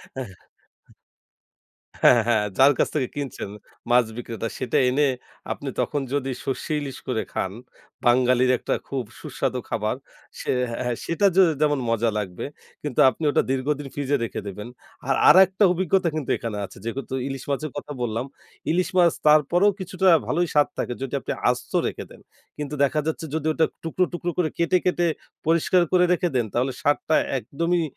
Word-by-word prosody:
হ্যাঁ। 130 -6 -5 1.7
হ্যাঁ, - - +8
হ্যাঁ, 115 -2 +2
হ্যাঁ। 110 -3 +3
যার 135 +2 +7
কাছ - - +3
থেকে 130 -5 0
কিনছেন 135 -8 -5 0.4
মাছ 120 0 +5
বিক্রেতা, 115 -1 -4
সেটা 125 -3 0
এনে 140 +3 +3 0.5
আপনি - - -6
তখন 145 - -1
যদি 135 -2 -1
সরষে 135 +4 -3
ইলিশ 135 -3 -6
করে 115 -4 0
খান, 95 - -2 0.5
বাঙালির 125 +1 +4
একটা - - -1
খুব 135 -3 -2 0.2
সুস্বাদু - - -2
খাবার। - - -1 0.4
সে - - -2 0.2
হ্যাঁ, 120 0 -2
সেটা 185 +4 +1
য - - +3 0.2
যেমন 145 -2 +3
মজা 115 0 +2
লাগবে, 95 -4 -4 0.4
কিন্তু 145 -4 -1
আপনি 160 - -7
ওটা - - +3
দীর্ঘদিন 140 +2 -1
ফ্রিজে 145 0 0
রেখে 110 - -4
দেবেন। 105 +3 -6 0.4
আর 135 - +3
আরেকটা 190 +2 +6
অভিজ্ঞতা 185 0 +1
কিন্তু 145 -5 -3
এখানে 115 -3 -4
আছে। - - -16
যেহেতু 130 +3 -4
ইলিশ 135 -1 -6
মাছের 145 +1 -2
কথা 145 - -5
বললাম। 115 +1 -1 0.5
ইলিশ 180 +2 +1
মাছ 175 -2 +5
তারপরেও 155 +7 +5
কিছুটা 190 0 -2 0.2
ভালোই 170 +7 +1
স্বাদ 145 -1 +4
থাকে, - - -2
যদি 135 0 -4
আপনি - - -4 0.2
আস্ত - - -4
রেখে - - -4
দেন। - - -14 0.4
কিন্তু 150 0 -4
দেখা 145 +3 +1
যাচ্ছে 160 0 -2
যদি 160 -1 -2
ওটা 160 0 +2 0.2
টুকরো, 165 +3 0
টুকরো 175 0 -2
করে 165 -3 +2
কেটে, 170 +2 +3
কেটে 175 -1 +2 0.4
পরিষ্কার 170 +2 +3
করে 180 -1 +5
রেখে 180 0 +1
দেন, 120 -3 +1
তাহলে 130 +3 +1
স্বাদটা 145 +2 +1 0.2
একদমই 165 +8 -1
145 Hz, 165 wpm, -24 LUFS, 125-170 Hz, 1.7 s, হ্যাঁ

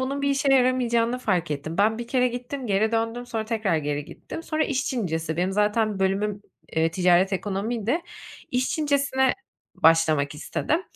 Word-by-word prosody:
bunun 275 +2 -2
bir 280 - +2
işe 275 0 +1
yaramayacağını 250 -2 +2
fark 180 -9 0
ettim. 150 +4 -4
Ben 220 +2 +3
1 235 0 -6
kere 250 0 +2
gittim, 250 +2 -5
geri 215 +2 +1
döndüm. 230 +2 -1
Sonra 225 -2 -3
tekrar 215 -6 0
geri 145 -1 -2
gittim. 325 - -9
Sonra 310 -1 0
iş 275 -1 -1
Çincesi, 165 - -2
benim 180 +2 0
zaten 210 +1 +1
bölümüm, 195 +2 0 0.3
eee, 160 0 +2
ticaret 180 +2 +3
ekonomiydi. 215 - -1 0.5
İş 250 +1 0
Çincesine 280 -3 +1 0.4
başlamak 155 -3 +3
istedim. 310 - -1
220 Hz, 160 wpm, -25 LUFS, 180-255 Hz, 0.5 s, Ben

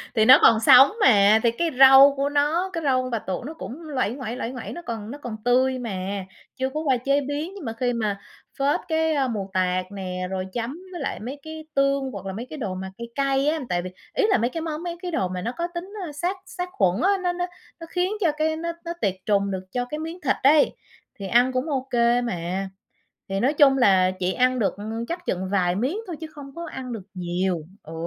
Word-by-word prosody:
Thì 220 - +4
nó 255 +3 +9
còn 225 -1 +6
sống 260 - +8
mà, 210 -1 +6
thì 235 - +4
cái 335 +8 -1
râu 270 +1 +9
của 280 +1 0
nó, 300 +6 +1
cái 330 - -3
râu 260 -3 +2
con 255 - -4
bạch 230 -2 -2
tuộc 190 +6 -3
nó 310 - -6
cũng 310 0 -8
nguây 255 -6 -1
nguẩy, 250 -3 -5
nguây 250 -1 -4
nguẩy, 255 - -7
nó 345 - -7
còn 225 -2 -5
nó 285 - -7
còn 240 -6 -6
tươi 255 +1 +3
mà, 195 -3 -4 0.3
chưa 260 0 -1
có 305 - -2
qua 275 -5 +1
chế 275 +4 +1
biến, 290 +6 -4
nhưng 375 -9 -8
mà 225 - -3
khi 245 +1 -1
mà 210 -4 -2 0.4
phết 285 +5 +2
cái, 320 -1 +1
a, 275 -3 +1
mù 205 -5 -4
tạt 185 0 +1
nè, 185 -2 -4
rồi 190 -1 -3
chấm 240 +1 -3 0.2
với 350 -5 -6
lại - - -3
mấy 260 +6 -7
cái 315 0 -8
tương 275 -1 +1
hoặc 195 -5 -8
là 190 - -4
mấy 230 +5 -5
cái 310 - -7
đồ 200 -8 -3
mà 190 0 -6
cay 235 0 -6
cay 275 0 +1
á. 315 +1 +1
Tại 175 -1 0
vì, 185 - -6 0.2
ý - - +1
là, - - +4
mấy 235 +2 0
cái 330 - -5
món, 320 0 -4
mấy 345 -1 -4
cái 360 - -4
đồ 190 - 0
mà 180 0 -5
nó 235 +6 -2
có 340 0 -1
tính, 370 +4 -6
ơ, 315 - -6
sát 350 +6 -2
sát 360 -1 -5
khuẩn 190 +1 +1
á, 380 - +3
nó 355 - +1
nó 355 0 -2 0.3
nó 330 - -9
khiến 360 +2 0
cho 330 -4 +3
cái 315 +1 +1
nó 335 +1 -3
nó 340 - -3
tiệt 195 -2 +1
trùng 200 -1 +1
được 185 -1 -4
cho 245 0 -1
cái 300 +5 -6
miếng 325 +3 -6
thịt 270 -3 +1
ấy, 290 +1 +5 0.4
thì 195 - -5
ăn 245 +5 +4
cũng 255 +5 -1
ô 270 -2 -2
kê 240 0 +3
mà. 190 -3 -3 0.6
Thì 195 0 -2
nói 275 +5 +2
chung 275 -2 +5
là 190 -6 +4
chị 185 +1 0
ăn 255 +3 +2
được 210 - +1 0.3
chắc 350 +1 -5
chừng 185 +1 -2
vài 180 -3 +2
miếng 265 - -1
thôi 345 - -5
chứ 320 - -5
không 285 -3 -12
có 340 0 -6
ăn 260 -5 -7
được 225 -4 -5
nhiều, 180 -1 -1 0.2
ừ. 160 - -11
255 Hz, 250 wpm, -24 LUFS, 200-305 Hz, 0.6 s, nó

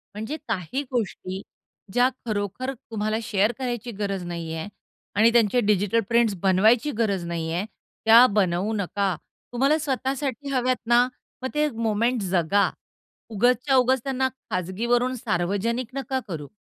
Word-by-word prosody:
म्हणजे 220 +9 -4
काही 220 - -2
गोष्टी 195 -5 -3 0.5
ज्या 245 +1 +4 0.2
खरोखर 215 +4 -2
तुम्हाला 215 -2 -3
शेअर 210 +1 +2
करायची 240 -2 -3
गरज 195 -3 -2
नाही 170 -2 -5
आहे 160 +4 -4 0.5
आणि 220 +3 +5
त्यांचे 235 0 +4
डिजिटल 205 +2 +2
प्रिंट्स 230 -3 +3
बनवायची 220 +9 +4
गरज 200 -6 0
नाही 165 -1 -3
आहे, 180 +4 -1 0.4
त्या 230 +3 +9
बनवू 200 -1 +1
नका. 200 -1 -1 0.4
तुम्हाला 275 +5 +3
स्वतःसाठी 275 -1 -2
हव्यात 255 -1 +2
ना, 240 +1 +6 0.4
मग 260 - -2
ते 300 0 +3
मोमेंट 230 0 0
जगा. 190 +1 +2 0.6
उगाचच्या 245 +5 +2
उगाच 260 0 +4
त्यांना 265 -1 0 0.2
खाजगीवरून 235 +8 0
सार्वजनिक 215 +4 -1
नका 270 -1 -2
करू. 155 -6 -5
225 Hz, 135 wpm, -25 LUFS, 195-250 Hz, 0.6 s, त्या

